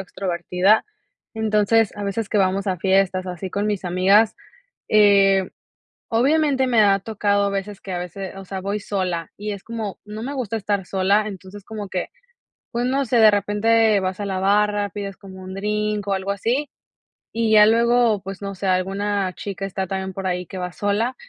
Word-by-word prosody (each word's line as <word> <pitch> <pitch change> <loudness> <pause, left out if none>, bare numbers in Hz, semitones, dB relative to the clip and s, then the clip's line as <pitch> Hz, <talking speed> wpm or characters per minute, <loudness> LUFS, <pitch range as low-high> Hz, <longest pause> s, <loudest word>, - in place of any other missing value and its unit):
extrovertida, 185 +2 +1 0.5
entonces 220 0 +2
a 205 - -5
veces 200 +2 -2
que 210 - +1
vamos 195 +1 +1
a 185 -3 -1
fiestas 190 0 +1
así 180 +1 -5
con 200 +3 -2
mis 205 -3 -2
amigas, 195 +5 +3 0.5
eh, 195 -2 +4 0.6
obviamente 270 +2 +2
me 235 -3 +4
ha 200 -1 +4
tocado 205 -1 0
a 200 - +1
veces 200 0 -4
que 195 - -8
a 180 - -2
veces 180 +2 -6
o 195 - -9
sea, 190 0 -5
voy 200 +2 -2
sola 185 -5 -3
y 210 +1 -4
es 200 -1 -7
como 225 -4 -5
no 215 +1 -7
me 275 +3 -4
gusta 240 -5 -3
estar 200 -3 -1
sola, 200 +3 +1
entonces 195 0 -10
como 210 -3 -7
que, 185 -1 -3 0.6
pues, 240 +1 -1
no 270 +2 0
sé, 240 0 +1
de 220 -1 +7
repente 210 +1 +2
vas 190 +2 -3
a 205 - -3
la 190 -1 -2
barra, 205 +1 +2
pides 200 0 -6
como 190 -1 -12
un 185 0 -8
drink 210 0 -2
o 200 - +1
algo 190 +1 -2
así 240 +8 -1 0.6
y 225 -1 0
ya 210 -1 +8
luego, 230 -1 +3
pues 195 +1 -8
no 200 - -4
sé, 195 +1 -4
alguna 195 +1 0
chica 195 0 -5
está 190 0 -3
también 190 0 -4
por 195 0 -4
ahí 180 0 -2
que 190 - -9
va 180 0 -4
sola 210 +6 -1
200 Hz, 190 wpm, -22 LUFS, 190-215 Hz, 0.6 s, ya